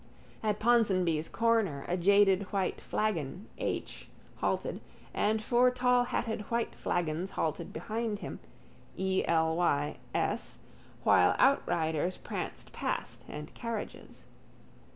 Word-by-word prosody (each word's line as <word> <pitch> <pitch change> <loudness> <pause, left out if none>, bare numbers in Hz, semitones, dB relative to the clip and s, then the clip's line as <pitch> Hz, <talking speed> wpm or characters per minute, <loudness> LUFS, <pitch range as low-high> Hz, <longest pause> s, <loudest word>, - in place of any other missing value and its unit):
At 210 -2 0
Ponsonby's 190 -9 +3
corner 225 -11 +1
a 175 - 0
jaded 195 +1 +4
white 195 -2 -1
flagon 185 -2 -2
H. - - -3 0.3
halted - - -1 0.3
and 215 +1 +2
four 245 +2 +4
tallhatted 245 -3 +1
white 235 0 0
flagons 175 +1 -1
halted 165 +1 -1
behind 225 -1 -3
him, - - -7 0.6
E.L.Y.'S, 165 -5 0 0.5
while - - +5
outriders 170 - +2
pranced - - -5
past - - -3
and 150 0 -7
carriages. 230 -3 -6
195 Hz, 95 wpm, -31 LUFS, 170-230 Hz, 0.6 s, while